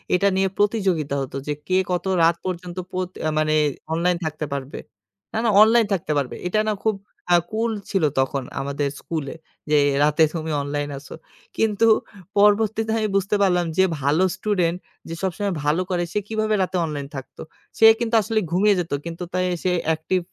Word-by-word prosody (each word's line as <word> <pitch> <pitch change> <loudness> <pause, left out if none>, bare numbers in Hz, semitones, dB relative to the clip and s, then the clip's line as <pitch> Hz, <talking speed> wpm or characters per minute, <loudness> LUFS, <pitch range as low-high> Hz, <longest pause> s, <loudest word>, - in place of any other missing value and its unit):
এটা 200 +2 +3
নিয়ে 195 0 +2
প্রতিযোগিতা 190 -9 +1
হত, 130 - -6
যে 150 - 0
কে 185 0 +2
কত 180 +1 -1 0.2
রাত 165 +1 +4
পর্যন্ত 180 0 -5 0.2
পত 185 -1 -2 0.2
আ - - +2
মানে 155 0 +1 0.4
অনলাইন 175 +1 +1
থাকতে 155 0 -3
পারবে 140 0 -5 0.6
না, - - -2
না - - +3
অনলাইন 225 +1 +6
থাকতে 165 -4 -2
পারবে। 140 -3 -2
এটা 215 +4 +1
না - - +1
খুব 220 -2 +2 0.4
আ - - +8 0.2
কুল 225 +1 0 0.2
ছিল, 190 -5 0 0.2
তখন 135 0 0 0.2
আমাদের 140 +1 -2
স্কুলে 155 -3 -5 0.3
যে 150 - +4 0.3
রাতে 150 +2 +4
তুমি 160 -1 -3
অনলাইন 145 +1 -3
আসো। 140 - -10 0.4
কিন্তু 225 0 +2 0.5
পরবর্তীতে 215 +2 +3
আমি 215 -1 0
বুঝতে 195 +2 +1
পারলাম, 180 -3 +3
যে 190 - +6 0.2
ভালো 150 +7 +2
স্টুডেন্ট 185 -4 0 0.3
যে - - -4
সবসময় 195 +1 -1
ভালো 150 +5 +1
করে, 175 -2 0
সে 210 - +1
কিভাবে 215 -1 0
রাতে 185 0 -2
অনলাইন 145 -3 -5
থাকতো। 135 - -9 0.4
সে 225 - +6
কিন্তু 235 -1 0
আসলে 220 +1 0
ঘুমিয়ে 200 +3 +4
যেত। 170 -3 -4
কিন্তু 170 +1 -5
তাই 185 0 +1 0.2
সে 185 - +1 0.2
অ্যাকটিভ 160 +3 0
180 Hz, 175 wpm, -22 LUFS, 155-210 Hz, 0.6 s, আ